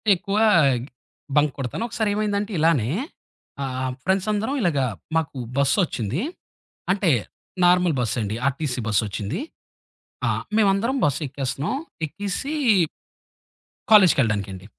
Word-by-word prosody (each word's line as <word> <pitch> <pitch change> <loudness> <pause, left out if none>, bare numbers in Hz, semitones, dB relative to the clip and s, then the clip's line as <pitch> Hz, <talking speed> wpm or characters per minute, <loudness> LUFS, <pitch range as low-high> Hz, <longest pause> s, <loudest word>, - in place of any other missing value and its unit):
ఎక్కువ 195 +4 -3 1.0
బంక్ 150 -2 +3
కొడతాను. 135 - -3
ఒకసారేమైందంటే 210 -2 -1
ఇలానే, 150 -8 +3 0.7
ఆహ్, 130 -1 -2
ఫ్రెండ్స్ 190 +2 +1
అందరం 220 +7 -1
ఇలాగ 170 -8 +1 0.4
మాకు 150 -4 -2 0.2
బస్సొచ్చింది. 140 - +1 0.7
అంటే, 190 -3 +2 0.5
నార్మల్ 180 -2 +4
బస్సండి. 110 -3 -1
ఆర్టీసీ 140 -2 -2
బస్సొచ్చింది. 105 - -1 0.9
ఆ! - - +2 0.3
మేమందరం 215 +5 +2
బస్సెక్కేస్తన్నాం. 140 - -2 0.3
ఎక్కేసి 205 - -4 1.4
కాలేజికెళ్ళడానికండి. 110 - +4
155 Hz, 85 wpm, -23 LUFS, 130-200 Hz, 1.4 s, నార్మల్